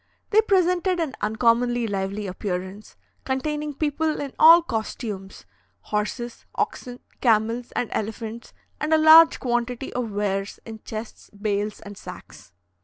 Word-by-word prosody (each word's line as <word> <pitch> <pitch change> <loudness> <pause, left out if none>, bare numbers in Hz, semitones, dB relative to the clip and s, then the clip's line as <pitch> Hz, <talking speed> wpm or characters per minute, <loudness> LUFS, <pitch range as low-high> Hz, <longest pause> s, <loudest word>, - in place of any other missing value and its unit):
They 435 +1 +6
presented 365 -3 +2
an 315 -5 -2
uncommonly 235 +2 +2
lively 200 0 -3
appearance, 190 +1 -5 0.3
containing 295 +2 -2
people 310 +1 -1
in 280 -2 -5
all 330 +2 +9
costumes, 220 - -5 0.4
horses, 225 +3 -4
oxen, 245 -1 -3 0.2
camels, 230 +1 +1
and 245 - -1
elephants, 225 +2 -5 0.3
and 310 +1 +2
a - - +5
large 315 +1 +8
quantity 245 +1 -2
of 245 -3 -2
wares 200 -1 -2
in 225 -1 -8
chests, 220 +1 -8
bales, 205 0 -2
and 205 -1 -10
sacks. 180 - -12
235 Hz, 125 wpm, -24 LUFS, 210-295 Hz, 0.4 s, all